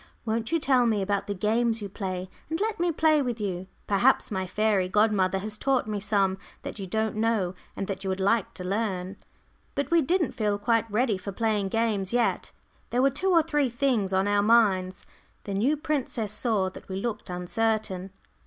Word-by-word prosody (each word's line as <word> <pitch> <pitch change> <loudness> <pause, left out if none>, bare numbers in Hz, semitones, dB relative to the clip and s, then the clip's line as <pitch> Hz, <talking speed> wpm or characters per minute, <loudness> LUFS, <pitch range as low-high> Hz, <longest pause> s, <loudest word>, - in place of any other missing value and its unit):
"Won't 225 0 -1
you 330 - +2
tell 260 -4 +3
me 210 -3 +1
about 200 0 -1
the 205 - -2
games 225 +4 +1
you 205 - -5
play, 190 -2 -4 0.2
and 325 +1 -2
let 430 -1 -1
me 350 0 +2
play 310 -1 +3
with 245 -4 -2
you. 190 -3 -3 0.2
Perhaps 200 +1 +3
my 190 -2 -2
fairy 200 -1 +1
godmother 200 -2 +2
has 210 +2 -5
taught 270 -2 +1
me 210 -1 -3
some 195 -2 +1 0.2
that - - -6
you 195 - -5
don't 220 +3 -1
know 215 -5 +1 0.2
and 195 - -3
that 195 0 -5
you 190 - -2
would 190 0 -2
like 200 +2 +1
to 180 - -6
learn." 190 -1 -2 0.6
But 285 - -2
we 335 -1 +5
didn't 335 +2 +1
feel 210 -4 0
quite 230 +2 +1
ready 215 -2 +1
for 200 +2 -5
playing 210 -1 0
games 220 -2 0
yet. 245 -1 +1 0.4
There 250 +2 +1
were 275 - +4
two 380 +8 0
or 335 -3 +5
three 295 -4 +1
things 240 -5 0
on 190 +1 +2
our 205 0 +3
minds. 200 -4 +3 0.4
The 200 - -5
new 250 +10 +2
princess 265 -8 -2
saw 210 -4 0
that - - -13
we 190 - -4
looked 215 +1 -4
uncertain. 195 +1 -1
215 Hz, 200 wpm, -27 LUFS, 195-240 Hz, 0.6 s, we